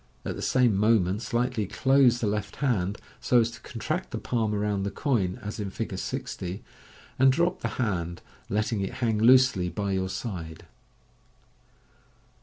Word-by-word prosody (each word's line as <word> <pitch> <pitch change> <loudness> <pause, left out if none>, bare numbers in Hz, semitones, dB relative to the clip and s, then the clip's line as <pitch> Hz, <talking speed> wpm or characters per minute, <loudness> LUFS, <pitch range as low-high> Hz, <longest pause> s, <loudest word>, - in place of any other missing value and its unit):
At - - -3
the - - -6
same 125 -5 +3
moment 105 -1 +2
slightly 120 -3 -1
close 125 +3 +3
the - - +1
left 105 0 -2
hand, 105 -8 0 0.2
so 125 - +3
as 115 0 +1
to - - -11
contract, 155 +9 -4
the 115 - -4
palm 110 -1 -1
around 105 -1 0
the 100 - -1
coin, 100 - 0
as 105 +2 -5
in 100 -2 -3
Fig. - - -4
60, 90 +3 -5 0.6
and 135 0 +6
drop 170 +6 +1
the - - -1
hand, 85 -8 -2 0.3
letting 105 +1 0
it 95 - -3
harg 110 -4 0
loosely 125 -6 +5
by 100 +3 -3
your 95 -1 -1
side. 90 -6 -6
105 Hz, 160 wpm, -27 LUFS, 95-125 Hz, 0.6 s, and